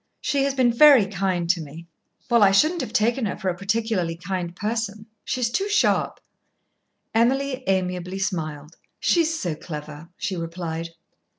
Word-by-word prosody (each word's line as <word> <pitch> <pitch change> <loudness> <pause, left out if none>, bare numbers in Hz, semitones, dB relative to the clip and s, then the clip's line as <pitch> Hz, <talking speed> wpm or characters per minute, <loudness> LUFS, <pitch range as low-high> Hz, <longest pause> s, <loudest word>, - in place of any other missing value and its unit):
She 275 -1 0
has 275 -1 -1
been 250 -3 +3
very 275 -3 +7
kind 185 -3 -1
to 180 -2 -3
me." 155 +3 -10 0.4
"Well, 235 -3 +3
I 200 - +7
shouldn't 310 - +3
have 255 - -5
taken 230 +2 +1
her - - -4
for 190 -3 -2
a 175 - -2
particularly 200 -3 -1
kind 175 0 -4
person. 215 0 -3 0.2
She's 245 -3 -1
too 395 +8 -1
sharp." 420 +1 +1 0.9
Emily 260 +3 +1
amiably 180 -1 -1
smiled. 155 -5 -4 0.2
"She's 325 -1 +2
so 175 -3 -2
clever," 150 0 -8
she 200 -5 -3
replied. 165 -1 -5
195 Hz, 155 wpm, -23 LUFS, 170-240 Hz, 0.9 s, very